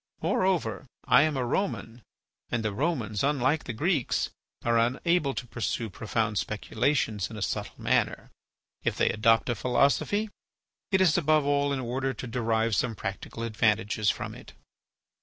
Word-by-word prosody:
Moreover, 160 - 0 0.2
I 125 - +6
am 155 -1 +1
a 125 - 0
Roman, 120 - -2 0.5
and 115 -2 -1
the 105 - 0
Romans, 115 - -1
unlike 145 +1 +1
the - - -3
Greeks, 150 - 0 0.3
are 115 -1 +3
unable 135 +5 +1
to 130 - -4
pursue 115 -2 -3
profound 110 +1 -1
speculations 110 -1 -1
in 110 - -8
a - - -6
subtle - - -3
manner. - - 0 0.5
If - - 0
they - - +3
adopt 115 +1 +3
a - - +2
philosophy 140 - +1 0.6
it 190 -1 +3
is 175 -2 +4
above 155 -2 +3
all 145 0 +2
in 140 - -1
order 130 +2 -2
to 115 - -6
derive 115 -2 0
some 115 +3 0
practical 100 +3 -5
advantages 110 -2 +1
from - - -3
it. - - -13
120 Hz, 155 wpm, -28 LUFS, 110-145 Hz, 0.6 s, I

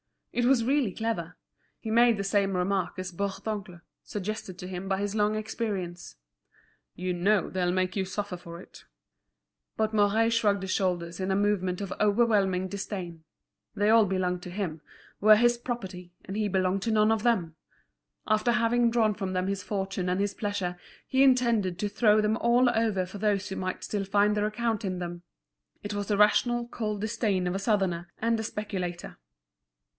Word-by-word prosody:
It 245 - +1
was 250 -2 +4
really 260 -5 +1
clever. 225 0 -3 0.4
He 220 - -6
made 235 0 +5
the 200 - -2
same 195 -1 +1
remark 185 +1 -1
as 185 0 -4
Bourdoncle, 195 -1 -4 0.2
suggested 205 -2 -5
to 180 - -6
him 185 +1 -6
by 190 0 0
his 200 +1 -2
long 210 0 +1
experience: 200 -5 -4 0.8
"You 180 0 -2
know 195 +3 +2
they'll 180 -1 0
make 185 0 0
you 195 -2 0
suffer 195 -1 -4
for 170 -1 -10
it." - - -15 0.9
But 220 0 0
Mouret 215 +2 +3
shrugged 205 -4 +2
his 190 - -3
shoulders 175 -3 -1
in 190 0 -2
a 190 - +2
movement 195 -2 0
of 195 - -4
overwhelming 205 -4 +2
disdain. 180 -4 -6 0.5
They 205 0 +2
all 225 -1 +6
belonged 180 -2 -1
to - - -7
him, 175 -5 -4 0.4
were 215 +1 +7
his 240 +2 +3
property, 190 -8 -6
and 195 - -6
he 215 0 0
belonged 190 0 0
to 225 - 0
none 215 0 +4
of 220 -1 0
them. 185 -10 +1 0.7
After 215 +3 +2
having 240 0 +3
drawn 225 -2 +2
from 195 -2 -4
them 185 0 0
his 200 0 -2
fortune 190 -2 -3
and 180 +1 0
his 200 0 0
pleasure, 190 -4 -3 0.3
he 265 - +1
intended 235 -9 +3
to 205 +1 -2
throw 215 0 +4
them 210 +1 +1
all 240 +1 +4
over 220 -5 +1
for 190 +3 -9
those 205 -1 0
who 190 - -5
might 185 0 -3
still 205 -2 -2
find 205 +1 +2
their 210 0 +1
account 225 0 -1
in 185 -2 -2
them. 175 -1 -5 0.6
It 205 0 -4
was 205 -1 -3
the 205 - +1
rational, 240 +3 +3
cold 210 -4 -3
disdain 210 -4 0
of 180 - -1
a 195 - -2
Southerner 190 -5 0
and 230 0 0
a - - -2
speculator. 185 -5 -5
205 Hz, 180 wpm, -28 LUFS, 185-220 Hz, 0.9 s, were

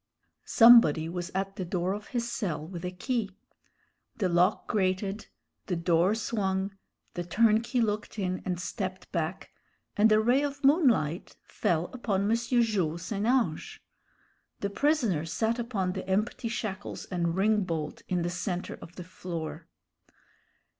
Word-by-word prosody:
Somebody 225 -10 +7
was 175 +1 -4
at 195 +1 -2
the 190 - -2
door 180 +1 -1
of 210 +1 -7
his 240 -2 -2
cell 170 -10 -3
with 170 0 -8
a 180 - -2
key. 200 +1 -3 0.8
The 190 -4 0
lock 175 +3 +2
grated, 195 0 -1 0.4
the 180 - 0
door 170 +4 +2
swung, 195 -3 -1 0.4
the 175 - -3
turnkey 230 +6 +2
looked 215 0 -2
in 185 -2 -2
and 180 -2 -2
stepped 185 -1 -5
back, 170 0 -3 0.4
and 215 +1 +4
a 215 - +6
ray 245 +5 +3
of 280 -1 -4
moonlight 250 - +2
fell 165 0 0
upon 205 -6 -1
M. - - +5
Jules 220 -9 0
St. 205 +3 -2
Ange. 240 -11 0 0.8
The 200 - -2
prisoner 240 - +1
sat 225 +8 -1
upon 210 -6 -1
the 185 - -6
empty 215 +4 0
shackles 215 -4 -4
and 170 -2 -1
ring 210 +2 +2
bolt 160 -4 -4
in 180 -2 0
the 175 - -1
centre 180 0 -4
of 170 - -12
the 180 - -7
floor. 170 -2 -6
195 Hz, 145 wpm, -28 LUFS, 175-225 Hz, 0.8 s, Somebody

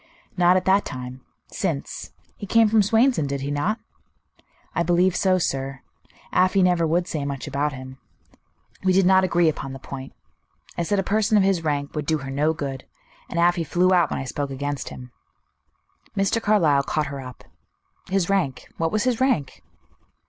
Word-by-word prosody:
"Not 180 0 +4
at 185 - -2
that 195 +2 +4
time. 125 0 -7 0.3
Since. 70 - -4 0.2
He 205 - -8
came 225 +2 +5
from 220 0 +4
Swainson, 225 - +3
did 140 0 -3
he 140 +1 -3
not?" 145 +10 0 1.0
"I - - 0
believe 175 +1 +2
so, 185 -2 +3
sir. 135 -5 -2 0.5
Afy 185 +1 +3
never 175 -2 +3
would 175 +3 +1
say 150 -3 -3
much 140 0 -4
about 145 +1 -1
him. 130 0 -9 0.8
We 185 -1 +3
did 190 0 +4
not 190 0 +5
agree 175 -2 +3
upon 135 -3 -2
the 135 - -8
point. 135 0 -8 0.6
I - - -2
said 200 +4 0
a 195 - +1
person 215 +2 +2
of 200 - +4
his 190 -4 +1
rank 145 -2 -2
would 150 -2 -4
do 160 - +2
her 135 -2 -7
no 150 +3 +1
good; 140 -5 -5 0.4
and 170 - -2
Afy 175 0 +3
flew 180 +4 +2
out 175 -2 +3
when - - -3
I - - -3
spoke 140 +2 -3
against 145 +1 -4
him." 125 -1 -10 1.1
Mr. 195 +4 +1
Carlyle 170 -11 +3
caught 150 +2 -1
her 140 - -5
up. 125 -1 -10 0.7
"His 190 -2 +1
rank. 190 -10 -1
What 165 0 0
was 215 +1 +1
his 250 -1 0
rank?" 245 - 0
170 Hz, 185 wpm, -23 LUFS, 140-190 Hz, 1.1 s, came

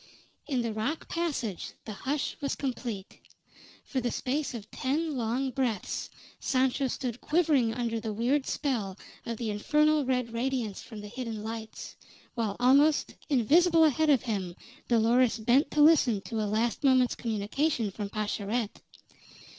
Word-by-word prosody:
In 255 -5 0
the 230 -2 -2
rock 250 +9 -3
passage 280 - -3
the 215 - -5
hush 275 +7 -2
was 280 - -1
complete. 240 -7 -5 0.6
For 260 - -2
the 245 - 0
space 270 +3 -2
of 215 -2 -9
ten 300 +3 -1
long 250 +3 -1
breaths 245 -7 -2 0.3
Sancho 265 +1 +1
stood 250 -2 -4
quivering 295 -9 +2
under 230 -2 -1
the 220 -1 -4
weird 250 +6 0
spell 220 -10 -2 0.3
of 230 -1 -3
the 225 -2 -2
infernal 300 +8 +2
red 250 -3 -1
radiance 235 -3 -2
from 220 -3 -9
the 210 - -8
hidden 225 -2 -5
lights, 220 0 -7 0.4
while 220 -4 -2
almost 280 +5 +4 0.2
invisible 325 +6 +5
ahead 315 +1 +3
of 275 -5 +4
him 195 -7 -3 0.3
Dolores 235 +1 +3
bent 240 +6 +3
to 300 - +1
listen 280 -10 +5
to 215 +3 -3
a 210 - -1
last 225 +5 0
moment's 260 -2 +4
communication 225 +2 -1
from 205 +1 -5
Pascherette. 210 +1 -2
245 Hz, 145 wpm, -29 LUFS, 220-275 Hz, 0.6 s, invisible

